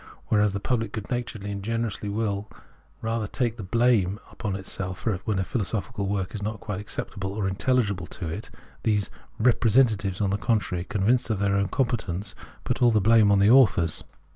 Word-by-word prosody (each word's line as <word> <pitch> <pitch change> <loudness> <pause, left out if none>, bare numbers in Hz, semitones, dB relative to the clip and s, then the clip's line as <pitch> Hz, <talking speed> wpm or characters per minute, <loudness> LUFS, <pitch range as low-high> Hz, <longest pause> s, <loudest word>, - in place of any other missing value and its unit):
Whereas 105 -2 +3
the 100 - -2
pubhc 115 +1 -1
good 105 -2 -6
naturedly 110 -4 -3
and 100 -1 -4
generously 115 -1 -2
will 105 -1 -2 0.5
rather 115 -1 -1
take 120 +1 -1
the 110 - -6
blame 110 -2 +2
upon 105 -4 -3
itself 95 -1 -4 0.2
when 110 -4 0
a 95 - +1
philosophical 105 -1 -2
work 95 -2 -2
is 105 - -5
not 110 +1 -3
quite 100 -2 -4
acceptable 100 -2 -5
or 100 -2 -1
intelhgible 100 -3 0
to 90 - -6
it, 100 +7 -5 0.3
these 105 -3 0
" - - -32
re 120 +2 +5
presentatives," 110 -6 +2
on 100 -2 +1
the 100 - 0
contrary, 100 -6 0
convinced 115 +6 +1
of 110 - +1
their 100 0 +1
own 100 0 +2
competence, 105 -7 -1 0.3
put - - -2
all 120 - +6
the 110 -2 +3
blame 110 0 +5
on 100 - +5
the 100 +3 +5
authors. 90 -11 +4
105 Hz, 190 wpm, -26 LUFS, 100-115 Hz, 0.5 s, all